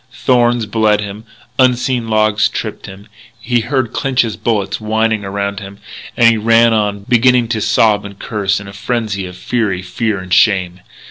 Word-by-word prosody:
Thorns 120 -2 +1
bled 105 0 +1
him; 105 +2 -8 0.3
unseen 125 -1 +1
logs 110 -1 +2
tripped - - -6
him; 95 +2 -12 0.3
he 120 +1 0
heard 120 0 -2
Clinch's 130 -5 0
bullets 110 -2 -2
whining 110 0 0
around 100 0 -3
him; 100 -1 -10 0.4
and 120 - +5
he 115 -1 +4
ran 115 +1 +4
on, 105 -2 -1
beginning 125 0 +3
to 110 -2 -1
sob 105 -1 +2
and 100 -1 -10
curse 100 -3 -2
in 100 - -10
a 100 - -10
frenzy 105 -3 -3
of 90 0 -11
fury, 105 -6 -2
fear, 105 +3 -2
and 95 -1 -5
shame. 90 -4 +2
110 Hz, 170 wpm, -15 LUFS, 100-115 Hz, 0.4 s, and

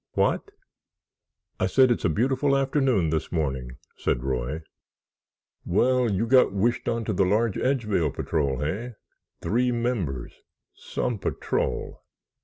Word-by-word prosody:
"What?" - - +1 1.1
"I - - +2
said 130 -2 +4
it's 120 - 0
a - - +4
beautiful 130 - +2
afternoon 135 - +1
this 80 -1 -2
morning," 65 -7 -2 0.2
said - - -1
Roy. 65 +4 -2 1.0
"Well, 125 +6 +2
you 100 +4 0
got 130 -1 +5
wished 105 +5 0
onto 115 -2 -1
the 95 - +2
large 105 +3 +1
Edgevale 105 - +1
Patrol, 70 -3 -1
hey? 105 +12 -3 0.5
Three 125 +3 +1
members. 115 - -2 0.4
Some 120 -4 -3
patrol!" - - -2
105 Hz, 120 wpm, -26 LUFS, 80-125 Hz, 1.1 s, got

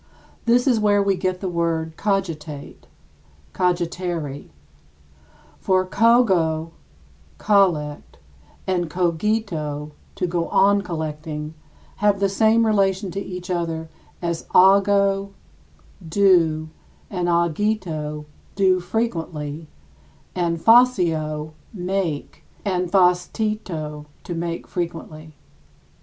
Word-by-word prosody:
This 240 +1 +3
is 250 -5 +3
where 205 -1 +3
we 200 0 +2
get 185 0 -2
the 190 - -2
word 165 -2 -1
cogitate 165 -8 -3 0.7
[cogitare]. 175 -4 -2 1.1
For 185 -1 +2
cogo 185 -8 +3 0.7
[collect] 170 - +1 0.5
and 175 -3 -1
cogito 170 -4 -1 0.2
[to - - -1
go 170 -1 -1
on 200 +1 +4
collecting] 155 -3 -5 0.4
have 205 -1 +2
the 200 0 +2
same 220 +3 +3
relation 195 -2 +1
to 195 - -4
each 180 -1 -6
other 165 -2 -2 0.3
as 170 -1 -3
ago 195 +1 +4 0.8
[do] 165 -4 +3 0.4
and 180 -3 -1
agito 170 -3 -1 0.3
[do 190 -2 +3
frequently], 165 -7 -3 0.7
and 170 -2 0
facio 165 -9 +3 0.2
[make] 180 -6 -3 0.2
and 180 -3 -1
factito 180 -4 0 0.2
[make 170 -1 -4
frequently]. 160 -3 -6
180 Hz, 90 wpm, -22 LUFS, 160-200 Hz, 1.1 s, on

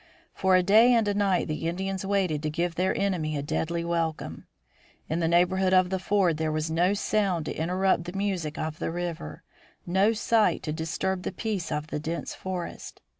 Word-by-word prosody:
For 190 -1 +3
a 185 - +4
day 220 +6 +6
and 225 -2 +2
a 205 - +1
night 200 -3 +1
the 155 +1 -3
Indians 190 +2 -3
waited 190 -6 0
to 155 - -1
give 170 +2 -1
their 185 +3 0
enemy 170 -6 -1
a 140 - -3
deadly 170 +3 -2
welcome. 165 -2 -3 0.6
In 160 - -1
the 165 - +1
neighborhood 185 +2 +3
of 185 0 +4
the 190 - 0
ford 185 -4 +2
there 160 0 -1
was 155 +1 -2
no 175 +5 +2
sound 195 -5 0
to - - -4
interrupt 180 +1 +1
the 175 - -6
music 185 -6 -2
of 155 0 -4
the - - -2
river, 170 - -5 0.4
no 190 +5 +3
sight 220 0 +2
to 150 - -2
disturb 165 +4 -2
the - - -3
peace 195 -2 -3
of 150 0 -2
the - - -2
dense 165 +3 -4
forest. 185 -2 -6
180 Hz, 195 wpm, -27 LUFS, 160-195 Hz, 0.6 s, day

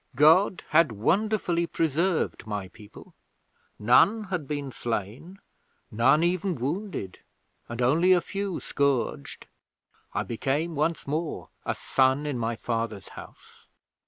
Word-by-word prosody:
God 165 +7 +5
had 155 -4 +4
wonderfully 175 - +1
preserved 165 -4 -1
my 100 -3 -4
people. 105 +1 -15 0.6
None 195 - +4
had 180 -7 -4
been 145 -2 -4
slain, 120 - -5 0.5
none 130 +8 +4
even 180 +1 0
wounded, 140 - -4 0.5
and 120 +1 -3
only 165 +9 +4
a 180 - +6
few 195 +1 -4
scourged. 140 -3 -1 0.7
I - - 0
became 140 +8 -2
once 155 +2 -1
more 155 +3 -3 0.2
a - - 0
son 130 +2 +1
in 140 -5 -2
my 115 0 -1
father's 115 -3 -4
house. - - -14
150 Hz, 120 wpm, -26 LUFS, 120-175 Hz, 0.7 s, a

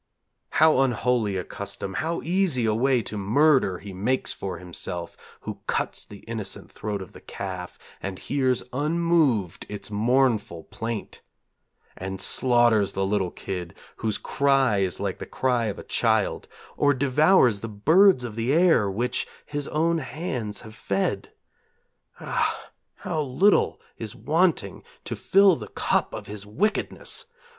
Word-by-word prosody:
How 155 -3 +5
unholy 120 -5 +1
a 90 - -2
custom, 100 0 -6
how 165 - -2
easy 170 -8 +1
a 110 - +2
way 125 +1 +2
to 105 - -5
murder 125 -1 +3
he 100 +1 -9
makes 110 +8 0
for 95 -3 -5
himself 85 0 -5 0.3
Who - - -6
cuts - - -1
the 100 -1 -12
innocent 110 -4 -6
throat 100 -2 -4
of 95 - -15
the - - -13
calf, 90 -2 -6 0.2
and 95 -1 -4
hears 130 0 0
unmoved 150 - +1
its 105 +1 -6
mournful 110 -6 +1
plaint! 115 -1 -6 0.7
And 95 0 -5
slaughters 120 -5 +3
the 95 - 0
little 95 -2 0
kid, 90 -2 -6 0.2
whose 110 -2 -1
cry 135 -6 +2
is 95 -2 0
like 100 -2 -3
the - - -7
cry 125 -3 0
of 105 -2 -3
a - - -8
child, - - +1 0.3
Or 145 -1 +3
devours 135 - +4
the 115 - -6
birds 160 - +5
of 115 -3 -6
the 115 +3 0
air 160 - +4
which 120 +5 -1 0.2
his 145 -1 -4
own 165 +2 +1
hands 125 - -4
have 110 - -11
fed! 100 -2 -2 0.9
Ah, - - -2 0.2
how 155 - -3
little 150 +9 +3 0.2
is - - -5
wanting - - +1 0.2
to - - -3
fill 195 -2 +5
the - - -8
cup - - 0
of - - -7
his 105 -1 -7
wickedness! 200 - -2
115 Hz, 145 wpm, -25 LUFS, 100-140 Hz, 0.9 s, How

